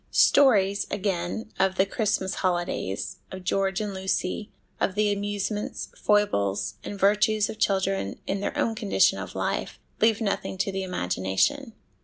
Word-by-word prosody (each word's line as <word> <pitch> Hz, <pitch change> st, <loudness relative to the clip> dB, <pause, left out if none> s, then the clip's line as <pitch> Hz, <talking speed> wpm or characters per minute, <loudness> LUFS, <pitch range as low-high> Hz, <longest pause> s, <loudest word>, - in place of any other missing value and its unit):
Stories, 205 Hz, -8 st, +4 dB
again, 195 Hz, +2 st, -2 dB
of 190 Hz, 0 st, +2 dB
the 190 Hz, -, +3 dB
Christmas 200 Hz, -2 st, -1 dB
holidays, 175 Hz, -, -1 dB
of 185 Hz, 0 st, -7 dB
George 195 Hz, +1 st, 0 dB
and 210 Hz, -2 st, -3 dB
Lucy, 190 Hz, +2 st, -2 dB, 0.3 s
of 190 Hz, -, 0 dB
the 210 Hz, 0 st, +2 dB
amusements, 205 Hz, +1 st, -3 dB
foibles, 100 Hz, -, +1 dB
and 200 Hz, -, -6 dB
virtues 210 Hz, +2 st, +3 dB
of 215 Hz, -, -11 dB
children 195 Hz, -, 0 dB
in 195 Hz, -, -1 dB
their 200 Hz, -, -3 dB
own 225 Hz, -, +1 dB
condition 210 Hz, -2 st, +2 dB
of -, -, -7 dB
life, -, -, -2 dB, 0.2 s
leave 220 Hz, -1 st, +4 dB
nothing 200 Hz, -3 st, -2 dB
to 195 Hz, +1 st, 0 dB
the 195 Hz, 0 st, -3 dB
imagination. 180 Hz, -, 0 dB
195 Hz, 145 wpm, -26 LUFS, 190-210 Hz, 0.3 s, Stories